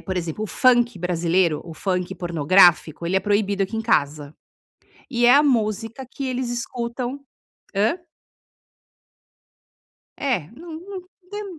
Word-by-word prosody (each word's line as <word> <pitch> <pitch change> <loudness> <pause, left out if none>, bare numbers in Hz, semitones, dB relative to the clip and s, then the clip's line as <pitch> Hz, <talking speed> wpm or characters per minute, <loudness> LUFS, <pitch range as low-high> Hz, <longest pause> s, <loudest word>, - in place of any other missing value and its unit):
por 190 -1 -5
exemplo, 175 +4 -3
o - - -4
funk 240 -1 +3
brasileiro, 170 -1 +1
o 165 -2 -9
funk 180 0 -2
pornográfico, 170 -1 +3
ele 185 +3 0
é - - +3
proibido 200 -1 +1
aqui 225 +4 -6
em - - -1
casa, 145 -7 0 0.8
e 240 0 +2
é 250 - +8
a 295 - +6
música 225 0 0
que 275 - -5
eles 250 -1 -2
escutam 240 +2 -4 0.6
hã? 215 - +1 2.2
É, 270 -3 0
n - - -20
n 325 +1 -9
não 385 -2 -7 0.3
tem 415 0 -5
215 Hz, 140 wpm, -22 LUFS, 175-250 Hz, 2.2 s, é